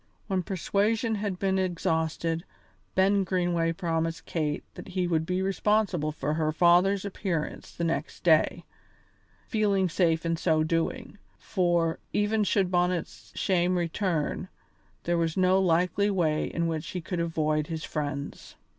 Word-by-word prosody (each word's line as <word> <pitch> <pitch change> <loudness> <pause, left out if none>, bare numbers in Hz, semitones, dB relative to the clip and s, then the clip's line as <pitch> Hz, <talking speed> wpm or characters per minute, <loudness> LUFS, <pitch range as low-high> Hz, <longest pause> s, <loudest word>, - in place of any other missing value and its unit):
When 190 -3 0
persuasion 205 +5 0
had 205 -3 -2
been 190 0 +1
exhausted, 165 -2 -1 0.5
Ben 195 +1 +4
Greenway 175 -3 +1
promised 165 -1 -2
Kate 150 -3 -2
that - - -10
he 185 -1 -1
would 160 -2 0
be 180 +1 0
responsible 195 -5 +1
for 150 0 -2
her 155 -1 0
father's 180 +4 +4
appearance 185 -5 -3
the 170 - -5
next 165 -1 -2
day, 160 -3 +3 0.8
feeling 200 -5 +1
safe 165 -1 +1
in 165 0 0
so 160 -2 +2
doing; 170 +8 -2 0.2
for, 175 -3 0
even 210 +1 +2
should 195 -2 +1
Bonnet's 180 -1 -1
shame 180 -1 +1
return, 175 -1 -1 0.6
there 175 0 +1
was 165 0 -1
no 185 0 +4
likely 180 +3 +2
way 165 -6 +1
in 170 - -2
which 160 -2 -2
he 180 - -4
could 175 +2 -4
avoid 155 -2 0
his 160 -2 -4
friends. 145 -2 -5
175 Hz, 140 wpm, -28 LUFS, 165-190 Hz, 0.8 s, Ben